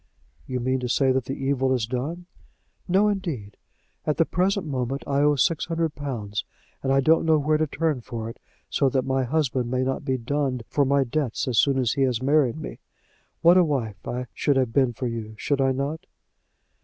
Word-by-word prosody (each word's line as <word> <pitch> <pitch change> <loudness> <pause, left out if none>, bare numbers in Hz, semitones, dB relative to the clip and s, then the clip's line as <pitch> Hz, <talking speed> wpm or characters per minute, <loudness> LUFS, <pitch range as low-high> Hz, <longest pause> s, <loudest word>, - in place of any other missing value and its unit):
"You 130 -1 -2
mean 130 +2 0
to 125 -1 -3
say 135 +1 +3
that 130 -1 0
the 135 - -3
evil 135 -1 +2
is 120 -3 -1
done." 140 +9 -4 0.6
"No, 195 +4 +4
indeed. 160 - -3 0.5
At 150 - -1
the 165 - +4
present 190 +2 0
moment 135 -1 -2
I 140 0 +1
owe 145 0 +4
six 155 +4 +1
hundred 165 -2 -1
pounds, 110 -9 -4 0.4
and 135 - 0
I 135 0 +4
don't 160 +4 +4
know 160 -1 +4
where 150 +1 +1
to 155 - +1
turn 150 -3 -1
for 115 -2 -5
it, 115 - -9 0.3
so 135 - +2
that 130 -1 0
my 130 -1 +1
husband 130 -3 0
may 130 +1 0
not 130 0 -2
be 130 -1 0
dunned 130 0 -1
for 145 - +1
my 140 +1 +3
debts 135 -1 -2
as 120 -4 +2
soon 140 -2 +3
as 125 -3 +2
he 140 - -1
has 125 -4 +2
married 140 -1 +2
me. 155 - -7 0.6
What 175 +2 +7
a 180 - +7
wife 115 - -2
I 125 +1 -3
should 145 - +1
have 130 -4 +1
been 130 -3 +3
for 125 +2 -5
you; 115 -2 -4
should 140 +3 0
I 135 0 +3
not?" 145 +6 -3
135 Hz, 210 wpm, -25 LUFS, 125-150 Hz, 0.6 s, What